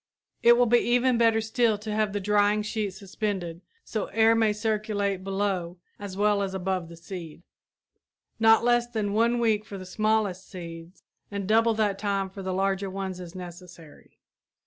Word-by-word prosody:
It 235 0 +6
will 245 - +5
be 240 +1 +4
even 245 0 +2
better 225 -1 +4
still 220 0 +1
to 210 +1 -5
have 215 -1 +1
the 205 - -2
drying 205 +1 +2
sheet 210 -1 -2
suspended 190 -3 -4 0.2
so 215 - -3
air 225 +2 +4
may 225 -2 +3
circulate 210 -3 -1
below 195 -3 -2 0.2
as 200 -2 -7
well 205 0 +2
as 195 -1 -3
above 185 -2 -2
the 170 - -11
seed. 170 -1 -9 1.0
Not 225 0 +6
less 240 0 +3
than 220 -4 -2
a 230 +4 +2
week 220 -3 +2
for 205 -2 -8
the 185 - -8
smallest 215 -2 0
seeds 170 -1 -10 0.3
and 200 -2 -4
double 225 +1 +3
that 205 -2 0
time 200 -2 -1
for 195 - -8
the 190 0 -3
larger 195 +1 0
ones 190 -1 -5
is 175 0 -9
necessary. 175 -3 -12
205 Hz, 170 wpm, -26 LUFS, 185-220 Hz, 1.0 s, It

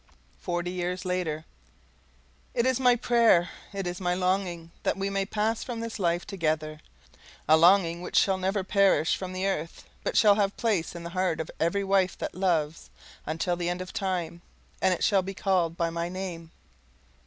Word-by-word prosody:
Forty 175 0 -2
Years 180 +1 -3
Later 170 -4 -2 1.1
It 235 - +2
is 260 -1 +2
my 250 -2 +5
prayer, 230 -7 +3 0.2
it 195 -2 -4
is 175 +1 -4
my 180 -1 +1
longing, 180 -2 -1
that - - 0
we 195 0 -2
may 195 -1 -1
pass 220 +2 -1
from 240 -3 -5
this 230 -1 -5
life 175 -1 0
together 155 -5 -2 0.7
a 155 - +7
longing 170 0 +4
which - - -6
shall 190 -1 +3
never 190 +1 0
perish 195 -4 +3
from 185 -1 -6
the 185 +1 -3
earth, 165 -4 -3 0.2
but - - -1
shall 210 -2 +7
have 200 -1 0
place 205 -8 0
in 170 - -7
the 170 - -6
heart 185 -3 0
of 160 - -4
every 170 +5 +1
wife 195 -1 +2
that - - -4
loves, 165 -4 -1 0.4
until 165 +3 -1
the 175 0 -2
end 175 +1 -2
of 185 0 -7
time; 175 -3 -2 0.4
and 190 - +3
it 180 - -1
shall 195 -2 +4
be 195 +1 -6
called 180 -4 0
by 165 -1 0
my 170 +1 -3
name. 180 -3 -6
185 Hz, 185 wpm, -27 LUFS, 170-195 Hz, 1.1 s, a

